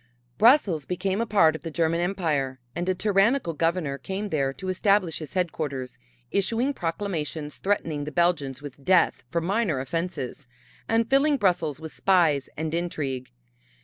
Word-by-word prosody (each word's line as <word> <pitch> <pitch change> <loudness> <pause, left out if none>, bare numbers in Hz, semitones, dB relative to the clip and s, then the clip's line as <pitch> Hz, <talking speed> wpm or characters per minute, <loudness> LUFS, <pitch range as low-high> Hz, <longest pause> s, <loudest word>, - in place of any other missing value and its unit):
Brussels 215 - +4
became 190 +3 -1
a 230 - -1
part 165 -7 +4
of - - -7
the 165 - -5
German 165 +1 0
Empire 155 -8 -1 0.2
and 175 +2 -2
a 185 - +2
tyrannical 205 +1 +2
governor 165 -3 -1
came 195 +8 -4
there 140 -5 0
to 190 +7 -8
establish 185 -2 +2
his 155 +3 -9
headquarters, 145 -8 -2 0.3
issuing 230 +7 +1
proclamations 165 - -3
threatening 165 -7 -1
the 150 - -5
Belgians 150 -5 0
with 140 -1 -10
death 180 +3 +3
for 170 +3 -1
minor 185 - 0
offenses, 140 -2 -4 0.4
and 225 0 +2
filling 280 +3 +3
Brussels 175 - +1
with 160 -1 -8
spies 165 -8 +2
and 160 +1 -3
intrigue. 145 -7 -3
170 Hz, 150 wpm, -26 LUFS, 150-195 Hz, 0.4 s, Brussels